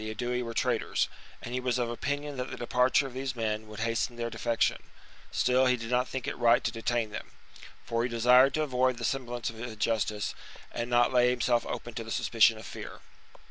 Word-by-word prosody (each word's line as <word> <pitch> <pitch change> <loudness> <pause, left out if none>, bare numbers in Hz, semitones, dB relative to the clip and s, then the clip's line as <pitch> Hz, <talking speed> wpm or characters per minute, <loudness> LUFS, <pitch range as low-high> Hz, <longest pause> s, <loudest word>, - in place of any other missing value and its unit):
c. 110 - -4
Aedui 125 +1 -1
were 115 -1 -5
traitors, - - +1 0.4
and 120 - -6
he 130 - 0
was 125 -1 0
of 120 -1 0
opinion 145 +5 -3
that 125 +1 -3
the - - -6
departure 125 +3 +2
of 135 - -7
these 130 0 -3
men 110 -2 -2
would 105 +1 -8
hasten 115 +1 -1
their 115 0 -3
defection: 115 0 0 0.5
still 130 +1 +3
he 125 0 +3
did 115 0 -6
not 125 +1 +2
think 130 -2 -5
it - - -2
right 120 0 +4
to 115 - 0
detain 115 -1 -1
them; 110 - -6 0.6
for 115 0 0
he 120 - 0
desired 125 +3 +5
to 155 - +1
avoid 130 -3 +1
the 115 - -3
semblance 120 -3 -2
of 110 - -13
injustice 110 -3 -1 0.4
and 120 +1 -3
not 120 +1 +3
lay 125 0 +5
himself 120 -1 +1
open 120 - -5
to 115 - -4
the 110 - -10
suspicion 115 0 +3
of 110 - -10
fear. - - -8
120 Hz, 215 wpm, -29 LUFS, 115-125 Hz, 0.6 s, desired